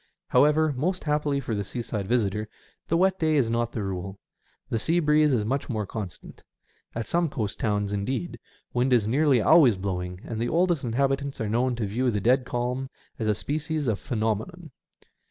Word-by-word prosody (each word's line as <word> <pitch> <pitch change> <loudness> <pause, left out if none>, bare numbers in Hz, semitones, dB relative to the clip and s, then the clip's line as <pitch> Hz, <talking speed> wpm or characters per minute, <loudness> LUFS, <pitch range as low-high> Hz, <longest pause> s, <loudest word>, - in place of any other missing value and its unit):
However, 150 +3 +4
most 180 +8 -1
happily 150 -2 0
for 120 - -4
the 100 -1 -1
seaside 105 -2 -4
visitor, 105 -2 0 0.4
the 165 - +2
wet 190 +1 +2
day 155 -1 +2
is 125 -6 +2
not 120 0 0
the 110 - -3
rule. 95 0 -4 0.5
The 115 - -1
sea 165 +9 +1
breeze 150 -1 +4
is 115 -5 +1
much 135 +6 -2
more 110 -4 -1
constant. 100 -4 -8 0.5
At 115 -1 -2
some 170 -1 +1
coast 110 -7 -3
towns, 105 -2 0
indeed, 100 0 -3 0.3
wind 125 +1 +2
is 110 -4 +3
nearly 135 0 +3
always 140 - +6
blowing, 90 -1 -4
and 115 -2 -5
the 120 - 0
oldest 175 -3 +2
inhabitants 135 +3 -1
are 110 -3 -2
known 120 +3 +1
to 115 -2 -2
view 120 +6 0
the 105 -3 0
dead 125 +5 +3
calm 125 +2 -2 0.3
as 110 - -1
a 105 - +2
species 155 - -2
of 110 -4 0
phenomenon. 120 - -3
120 Hz, 185 wpm, -26 LUFS, 105-150 Hz, 0.5 s, always